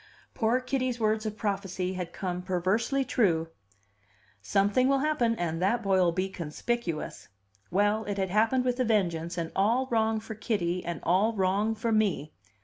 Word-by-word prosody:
Poor 230 +1 +2
Kitty's 255 -1 -2
words 215 0 +1
of 215 0 -5
prophecy 195 -3 -2
had 180 -2 -5
come 180 -1 -3
perversely 195 +9 0
true: 165 -11 +1 0.9
"Something 200 - +2
will 275 0 +3
happen, 270 -5 +1
and 170 -3 -2
that 230 +6 +1
boy'll 190 -3 +3
be 185 +3 -1
conspicuous." 175 +1 -4 0.4
Well, 205 +4 +1
it 205 -1 -3
had 190 -2 -1
happened 225 +5 +2
with 250 0 0
a - - +3
vengeance, 175 -6 0
and 165 -1 -3
all 230 +7 +2
wrong 220 -1 +2
for 220 +1 -7
Kitty, 195 -5 -1
and 170 -1 -4
all 195 +6 +3
wrong 200 +2 +1
for 230 +1 -2
me! 195 -9 +1
205 Hz, 160 wpm, -28 LUFS, 180-230 Hz, 0.9 s, will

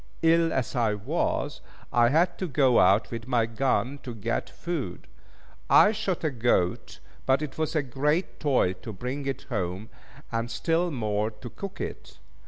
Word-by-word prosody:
Ill 165 0 +4
as 130 -2 -1
I 115 -4 +2
was, 105 - -2 0.3
I 120 0 +5
had 170 +6 +2
to 185 - -1
go 135 -5 +4
out 95 +4 +4
with 115 0 -5
my 120 -3 +2
gun 125 +2 0
to 125 -2 -7
get 115 +2 -2
food. 155 - -5 0.6
I 210 - +7
shot 200 -6 -2
a 155 - +1
goat, 115 -8 0 0.3
but 135 +3 +3
it 150 +1 -6
was 160 +1 -1
a 155 - +2
great 150 +7 -1
toil 130 -11 +2
to 110 - -7
bring 130 +7 -4
it 135 - -3
home, 100 -1 -3 0.4
and 115 0 -1
still 165 +9 0
more 110 -6 -1
to 110 +2 -10
cook 195 -1 -7
it. - - -6
125 Hz, 170 wpm, -27 LUFS, 110-155 Hz, 0.6 s, I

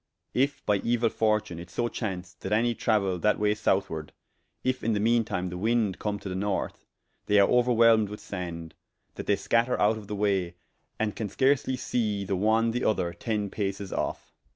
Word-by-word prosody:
If 135 +2 0
by 105 -1 +2
euil 115 0 +1
fortune 105 -5 0
it 85 +1 -9
so 120 +5 -1
chaunce 95 -6 -4
that 95 - -5
any 115 +3 +3
trauaile 100 -6 0
that 105 - +3
way 105 0 +2
southward, 95 -7 -1 0.5
if 130 0 -1
in 115 - +1
the 105 - 0
mean 115 +2 +3
time 90 -4 -3
the 90 0 -6
wind 110 -2 +1
come 105 -1 -2
to - - -7
the 95 - -3
north, 100 +1 -3 0.4
they 105 0 +5
are 100 - +6
ouerwhelmed 115 -3 +4
with 105 - -7
sande, 85 -4 -6 0.4
that - - -7
they - - +4
scatter 120 +2 +1
out 110 +1 +3
of 105 - -12
the 105 - -4
way, 95 -4 0 0.4
and 110 -2 -1
can 110 -3 -3
scarsely 130 +3 +2
see 105 -5 -1
the 95 - -1
one 110 +4 +2
the 125 +2 -2
other 85 -5 +1
ten 105 +2 -2
pases 100 -1 -3
of. - - -3
105 Hz, 195 wpm, -27 LUFS, 95-115 Hz, 0.5 s, are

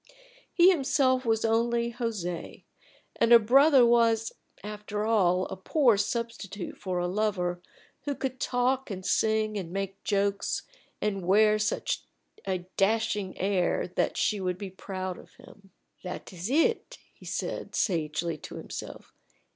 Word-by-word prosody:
He 360 +2 +6
himself 265 -5 +1
was 225 0 +2
only 235 +1 +1
José, 215 -8 -4 0.5
and 230 - +2
a 235 - +11
brother 265 +4 +6
was, 230 -1 +3 0.3
after 210 0 -4
all, 185 -5 +3
a - - -6
poor 235 +5 +3
substitute 210 -2 -3
for 185 -2 -4
a 175 - 0
lover 180 -3 -1 0.4
who 285 -1 -1
could 260 -1 -4
talk 255 +1 0
and 190 -2 -6
sing 215 -1 +1
and 170 -3 -7
make 195 0 -4
jokes, 200 -1 0 0.4
and 195 -3 -1
wear 215 +2 +5
such 215 - -1 0.5
a 185 -2 -2
dashing 205 -1 +1
air 190 -2 0
that - - -1
she 210 - +1
would 180 -1 -2
be 195 -1 -7
proud 185 -1 -5
of - - -17
him. 200 -1 -17 0.3
"That 180 +1 -7
is 180 +4 -5
it," 460 - +1 0.2
he - - -17
said, - - -4
sagely, 160 -2 -1
to - - -9
himself. - - -8
210 Hz, 140 wpm, -28 LUFS, 185-235 Hz, 0.5 s, a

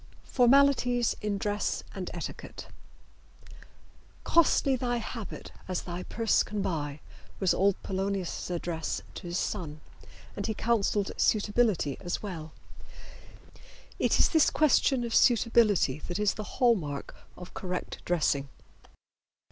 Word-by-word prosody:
FORMALITIES 245 -2 +3
IN 210 -1 -1
DRESS 205 +1 -1
AND - - -5
ETIQUETTE. - - -7 1.6
"Costly 305 -4 +3
thy 245 -1 -1
habit 225 -2 -7 0.2
as 185 -1 -2
thy 175 0 -5
purse 225 +3 +1
can 205 -2 -3
buy" 145 -4 -3 0.4
was 190 -3 +3
old 195 0 +3
Polonius' 195 -2 -3
advice 170 -2 -3
to 180 - -8
his 175 +1 -2
son, 160 -9 -3 0.6
and 200 - -3
he 220 - -2
counseled 210 -3 +1
suitability 205 - +2
as 175 - -3
well. 165 -6 -6 1.5
It - - +2
is - - +4
this 320 -3 +4
question 275 -4 +3
of 235 -1 -3
suitability 225 - +4
that 175 - -3
is 210 -1 +2
the 215 - -6
hall 245 -2 +5
mark 145 -9 -5 0.2
of 180 - -10
correct 180 -1 -5
dressing. 145 -5 0
205 Hz, 125 wpm, -29 LUFS, 175-235 Hz, 1.6 s, hall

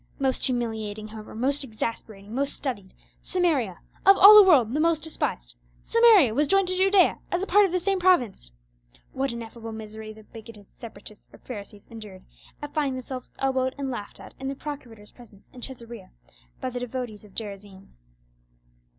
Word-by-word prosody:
Most 265 -2 +1
humiliating, 220 -4 -3
however, 215 0 -10
most 275 +5 0
exasperating, 215 -3 -6
most 275 +2 -1
studied, 205 -9 -5 0.3
Samaria, 295 - 0 0.2
of 390 0 +7
all 410 +2 +10
the 425 - +11
world 275 - +4
the 300 - 0
most 325 -1 +2
despised—Samaria 265 - +2
was 290 +5 +1
joined 390 +1 +2
to 370 - 0
Judea 385 0 +3
as 355 +2 -1
a - - -1
part 405 +1 +4
of - - -8
the 365 - 0
same 390 +1 0
province! 260 - +2 0.6
What 270 0 -1
ineffable 230 -1 -8
misery 220 0 -8
the 215 0 -14
bigoted 215 -2 -14
Separatists 215 -2 -12
or - - -15
Pharisees 205 -4 -10
endured 210 -5 -11 0.4
at 290 - -7
finding 285 -4 0
themselves 255 0 -7
elbowed 260 -1 0
and 275 -1 -3
laughed 210 -5 -7
at - - -12
in 270 - -5
the 275 - -3
procurator's 245 -8 -9
presence 220 -5 -19
in 250 - -12
Caesarea 235 -6 -9 0.5
by 255 -1 -4
the 245 - -4
devotees 245 -3 -6
of 205 -2 -18
Gerizim! 200 -3 -8
245 Hz, 165 wpm, -25 LUFS, 215-295 Hz, 0.6 s, the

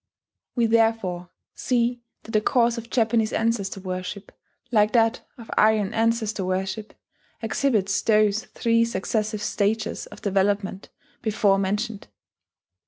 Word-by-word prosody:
We 240 -2 +3
therefore 225 -6 +1 0.2
see 245 -1 0 0.2
that 225 - -10
the 215 - +2
course 235 +1 +2
of 230 0 -11
Japanese 225 -2 +2
ancestor 225 -4 -1
worship, 185 +1 -6 0.4
like 210 -2 +3
that 230 0 +3 0.2
of 230 -2 -11
Aryan 215 -2 +3
ancestor 225 -2 0
worship, 190 +3 -3 0.5
exhibits 220 -4 +1
those 215 0 +2
three 230 -1 +1
successive 215 0 -2
stages 210 +2 -1
of - - -14
development 195 -1 0 0.3
before 205 -3 +2
mentioned. 210 +2 -2
215 Hz, 115 wpm, -24 LUFS, 200-230 Hz, 0.5 s, We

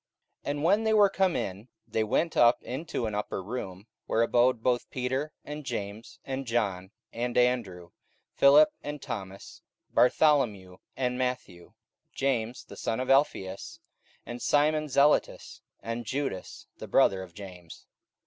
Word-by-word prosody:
44:001:013 - - -3
And 145 +1 -2
when 200 +6 +3
they 220 0 +2
were 205 -2 +6
come 190 -2 +1
in, 100 +4 -4 0.2
they 110 - 0
went 160 +10 0
up 120 0 +4
into 135 -1 -4
an 110 - -3
upper 105 -2 -3
room, 100 -3 -6 0.2
where 115 - +2
abode 120 0 +2
both 125 -1 0
Peter, 130 +4 -2
and 150 +1 -6
James, 110 -3 -6
and 135 -1 -4
John, 100 -6 -1 0.2
and 120 +1 -2
Andrew, 110 -9 0 0.4
Philip, 145 +2 +6
and 150 0 -6
Thomas, 95 -5 -8 0.3
Bartholomew, 125 -10 +2 0.2
and 125 -1 -1
Matthew, 120 -9 -4 0.4
James 125 -3 -1
the - - -12
son 115 - -2
of 130 +1 0
Alphaeus, 100 -9 0 0.5
and 120 0 -7
Simon 150 +1 +2
Zelotes, 140 +2 +1 0.2
and 115 +2 -4
Judas 130 -5 -4
the - - -7
brother 95 -1 +3
of 90 -2 -11
James. 90 -4 -11
125 Hz, 145 wpm, -28 LUFS, 100-140 Hz, 0.5 s, were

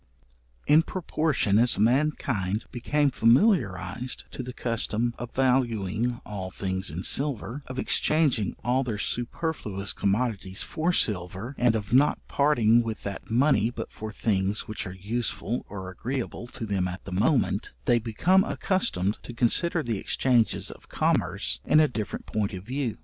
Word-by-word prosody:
In 150 +2 +6
proportion 155 - 0
as 120 +1 +3
mankind 115 -4 +1
became 145 +4 +1
familiarized 115 - +2
to - - -5
the 125 0 -6
custom 115 -1 -2
of 120 -1 -6
valuing 120 -3 +1
all 95 -3 -5
things 95 +1 -2
in 85 +5 -4
silver, 140 -1 0
of 130 - -7
exchanging 140 - +2
all 130 +2 +1
their 115 -5 -3
superfluous 115 - -2
commodities 100 -2 -1
for 165 +2 -1
silver, 100 - 0
and 120 -3 +2
of 105 0 -3
not 140 +4 +5
parting 120 -6 +3
with 115 -2 -5
that 100 -1 -6
money 120 -1 +3
but 120 - -7
for 110 0 -7
things 100 -1 0
which 110 -3 -4
are 95 - -7
useful 115 +3 -3
or 95 -2 -6
agreeable 120 +3 -4
to 120 -1 -6
them 95 -3 0
at 90 +1 -7
the 100 - -7
moment, 105 - +1
they 120 -1 +4
become 165 - +3
accustomed 110 - -1
to 120 - -9
consider 160 +8 +3
the 115 -4 -2
exchanges 120 0 +1
of - - -15
commerce - - 0
in 155 - +4
a 155 - +5
different 110 -6 -5
point 105 -1 -2
of 95 -1 -6
view. 125 0 -3
115 Hz, 150 wpm, -26 LUFS, 100-130 Hz, -, In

